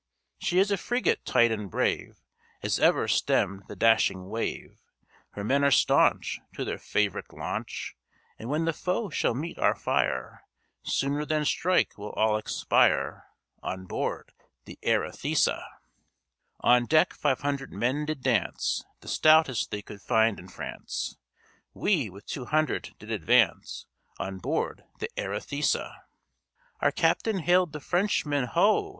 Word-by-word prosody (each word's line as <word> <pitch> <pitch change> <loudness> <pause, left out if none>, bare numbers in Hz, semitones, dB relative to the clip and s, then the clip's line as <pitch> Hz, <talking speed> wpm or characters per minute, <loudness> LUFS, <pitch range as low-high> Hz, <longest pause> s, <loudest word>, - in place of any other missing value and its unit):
She 175 - 0
is 195 +2 +4
a 200 - +2
frigate 240 +2 0
tight 120 -1 +4
and 105 -3 -3
brave - - -1 0.5
As - - 0
ever - - +3
stemmed 95 +1 +1
the 105 - -8
dashing 95 -3 +3
wave; 115 +2 -4 0.5
Her 100 - -5
men 140 +6 +2
are 140 - +5
staunch 135 - +3 0.2
To - - -3
their - - -4
fav'rite 105 -2 -1
launch, - - -5 0.4
And 115 - -6
when 155 +3 0
the 165 - +1
foe 185 +4 -2
shall 120 - 0
meet 160 +6 -5
our - - +3
fire, 65 -1 -1 0.4
Sooner 140 +2 -1
than 150 0 0
strike 180 - +1
we'll 105 +1 -7
all 110 0 +2
expire 110 - +1 0.3
On 95 0 -5
board - - -3 0.3
the - - -11
Arethusa. - - +1 1.0
"On 120 0 +4
deck 155 0 +4
five 140 -4 0
hundred 140 -2 -2
men 135 +5 -1
did 155 -4 -4
dance, - - 0 0.2
The - - -15
stoutest 155 -6 +4
they 105 0 -5
could 100 0 -11
find 110 0 +2
in 90 - -11
France; 90 - -5 0.6
We, 160 - +1
with 100 +2 -13
two 130 - -5
hundred, 155 +1 -1
did - - -10
advance - - +2 0.3
On 95 0 -5
board 145 +10 -2
the 455 - -5
Arethusa. - - -1 0.9
Our - - +3
captain 220 -3 +1
hailed 180 0 +3
the 150 - -6
Frenchman, 150 -5 0
'Ho!' 125 - +2
140 Hz, 145 wpm, -27 LUFS, 110-160 Hz, 1.0 s, are